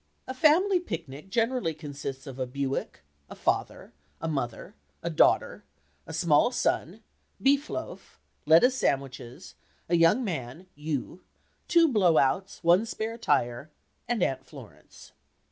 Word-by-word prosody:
A 260 - -4
"family 340 +8 +4
picnic" 150 - -7
generally 230 -6 0
consists 140 -3 -7
of 135 -2 -9
a 130 - -2
Buick, 135 - -4 0.3
a - - -9
father, - - -2 0.3
a 165 - -4
mother, 135 -7 -4 0.3
a - - -2
daughter, - - +2 0.4
a - - -7
small 160 +5 +3
son, - - -1 0.4
beef 280 +2 +2
loaf, - - -7 0.3
lettuce 170 +12 +6
sandwiches, 135 - -3 0.3
a 170 - +2
young 165 +9 +4
man 160 - -5
(you), 150 +3 -5 0.5
two 335 -1 +5
blow 190 - +3
outs, 185 +8 0
one 175 +6 +4
spare 225 +1 -4
tire, 140 - 0 0.4
and 235 -6 0
Aunt 130 0 -1
Florence. - - -14
165 Hz, 130 wpm, -27 LUFS, 135-230 Hz, 0.5 s, lettuce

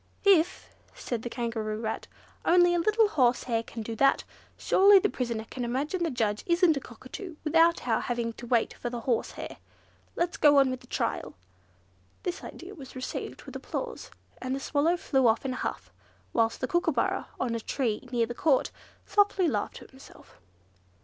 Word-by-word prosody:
"If," 360 -4 +4 0.3
said 240 -3 -4
the 240 - -5
Kangaroo 225 -3 -3
Rat, 220 -1 -4 0.4
"only 350 0 +5
a 350 - +2
little 430 +5 +3
horsehair 245 - +2
can 230 0 -7
do 225 +1 -5
that, 275 +2 +4 0.3
surely 400 +1 +6
the 405 +2 +3
prisoner 235 -3 -3
can 250 - -4
imagine 280 +9 -2
the 335 - +1
judge 220 -6 -1
isn't 340 -2 +4
a - - -1
cockatoo, 270 - -9
without 330 -2 +3
our 225 -2 +2
having 235 -1 -2
to 240 - -10
wait 235 -2 +2
for 240 - -5
the 240 -1 -5
horsehair. 235 -1 -2 0.6
Let's 345 0 -1
get 295 -1 +6
on 275 -2 +5
with 255 - -4
the - - -18
trial." - - -2 0.9
This 360 +1 -3
idea 370 +3 -9
was 270 -8 -11
received 255 - -5
with - - -11
applause, 485 -1 -5 0.3
and 255 +1 -2
the - - -3
Swallow 310 +5 +1
flew 265 -6 +2
off 225 +4 +2
in 260 - -1
a - - -5
huff; - - -4 0.4
whilst 225 -1 +1
the 255 - 0
Kookooburra, 340 -2 0
on 245 -3 -1
a 230 - -1
tree 240 0 -2
near 235 -2 +2
the 240 - -6
Court, 275 +1 +2 0.3
softly 405 -3 +3
laughed - - -1
to - - -10
himself. 265 - -17
260 Hz, 180 wpm, -28 LUFS, 235-340 Hz, 0.9 s, surely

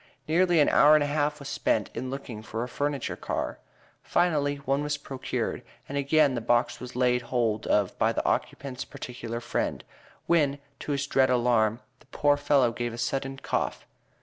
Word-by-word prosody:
Nearly 175 +1 +3
an 145 - +5
hour 150 +2 +6
and 150 - +4
a - - 0
half 150 0 0
was 140 -2 -9
spent 110 -6 0
in 130 - -4
looking 130 -5 -6
for 115 +1 -4
a - - -4
furniture 145 +1 -2
car. - - -3 0.4
Finally 145 -5 +1
one 140 0 -1
was 145 0 -1
procured, 135 -2 -4 0.3
and 140 - -6
again 140 0 +3
the 120 - -2
box 120 +1 +1
was 125 -1 -8
laid 125 -1 +2
hold 115 -3 -1
of 100 -3 +2
by - - +3
the - - -2
occupant's 130 -2 -2
particular 120 -4 -6
friend, - - -2 0.4
when, 150 -5 +2 0.2
to 145 - -3
his 140 0 -1
dread 135 -2 +3
alarm, 120 -2 +2 0.2
the - - -24
poor 145 0 +2
fellow 145 -3 +3
within 115 - -9
gave 120 -1 -2
a - - -9
sudden 135 +3 -2
cough. - - -2
135 Hz, 185 wpm, -27 LUFS, 120-145 Hz, 0.4 s, hour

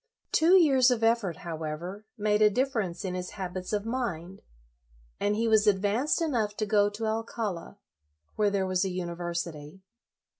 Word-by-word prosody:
Two 335 +4 +5
years 270 -8 +5
of 240 -3 0
effort, 225 -7 +2
however, 170 +5 -5
made 210 0 +1
a 210 - +7
difference 210 -7 -1
in 185 - -2
his 180 0 -5
habits 185 -1 -5
of 210 -1 -1
mind, 195 -7 -4 0.8
and 205 +1 +1
he 230 +2 0
was 220 -1 +4
advanced 210 - +2
enough 225 -9 -1
to 215 - 0
go 205 0 +3
to 210 +2 -5
Alcala, 220 -4 -3 0.6
where 210 -1 +2
there 200 -1 0
was 185 0 +1
a 190 - -1
university. 170 -2 -5
205 Hz, 155 wpm, -28 LUFS, 180-225 Hz, 0.8 s, a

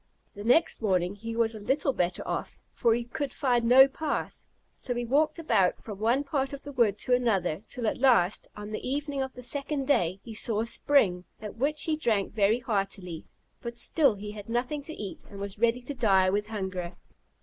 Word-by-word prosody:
The 205 - -8
next 245 +7 +3
morning 185 -3 +1
he 225 +3 -7
was 230 -1 +1
little 265 +6 0
better 180 -4 -2
off, - - -4 0.2
for 230 -2 +2
he 240 - -2
could 265 +4 -4
find 245 -5 +1
no 260 +3 +8
path. 295 +3 -4 0.3
So 245 - -4
he 240 0 -2
walked 300 +6 +2
about 195 - +1
from 205 -3 -8
one 235 +6 +2
part 275 -1 -2
of 280 - -7
the 285 - -8
wood 230 -7 +2
to 250 - 0
another, 195 -9 +1
till 245 -3 -4
at 215 - -1
last, 230 -8 +3
on 210 0 -8
the 215 - -3
evening 280 +1 -3
of 265 0 -4
the 250 - -10
second 275 +2 0
day, 190 - +2
he 230 - -9
saw 215 0 +3
a - - -1
spring, 210 -8 +2
at 210 -2 -8
which 295 +5 0
he 315 - +1
drank 225 -9 0
very 210 +1 +3
heartily; 195 -6 -3 0.4
but 235 0 -6
still 275 -1 +4
he 205 +1 -7
had 210 0 -10
nothing 250 +5 -1
to 320 - -6
eat, 200 -2 -7
and 200 - -10
was 200 0 -6
ready 235 +2 +1
to 285 - -5
die 195 -7 +3
with 210 +1 -1
hunger. 185 -5 -4
230 Hz, 205 wpm, -28 LUFS, 205-270 Hz, 0.4 s, no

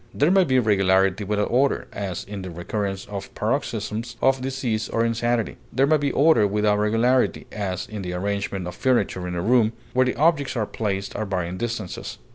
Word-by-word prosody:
There 150 +5 +3
may 190 -1 +5
be 130 -4 +2
regularity 95 -3 +3
without 105 +1 -1
order, 135 +3 +2
as 95 -3 -4
in 100 -1 -7
the 95 - -6
recurrence 95 +3 -3
of 100 -1 -7
paroxysms 115 -1 -2
of 135 -1 +2
disease 130 -5 -2
or 115 0 +1
insanity; 115 0 0
there 135 - +3
may 155 +2 +4
be 145 -1 0
order 140 -8 +4
without 105 0 +1
regularity, 115 +4 +2
as 95 -3 -3
in 105 -2 -6
the 90 -1 -4
arrangement 100 0 -2
of 90 - -5
furniture 110 -8 0
in 90 - -4
a 85 - -2
room, 115 0 +3 0.2
where 130 0 +3
the 125 - -1
objects 150 -3 +2
are 110 -3 0
placed 100 -2 -3
at 110 - -2
varying 90 -2 -2
distances. 110 -4 -4
110 Hz, 190 wpm, -24 LUFS, 95-125 Hz, 0.2 s, may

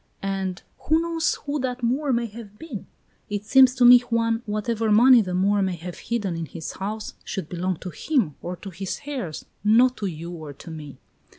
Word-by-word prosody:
"And 195 -2 -3 0.2
who 315 +2 +4
knows 335 -1 0
who 290 +1 -1
that 255 -1 -3
Moor 270 +4 +1
may 235 -1 +1
have 210 -2 -10
been? 260 - -8 0.4
It 205 0 -3
seems 260 +1 +6
to 250 -2 +4
me, 245 0 +10
Juan, 230 -1 0
whatever 215 +1 -1
money 240 +3 +7
the 180 -3 -3
Moor 200 +2 +2
may 190 -2 0
have 175 +1 -8
hidden 210 -7 -2
in 165 -1 -4
his 160 +1 -6
house 210 +3 -5
should 190 -6 -4
belong 180 +1 -2
to 180 - -6
him, 240 - 0
or 180 +1 -4
to 195 +2 -9
his 185 +2 -5
heirs, 250 - -5 0.2
not 240 +4 +5
to 205 - -2
you 170 0 -6
or 155 -4 -8
to 165 +4 -11
me." 150 -3 -9
210 Hz, 200 wpm, -24 LUFS, 180-245 Hz, 0.4 s, me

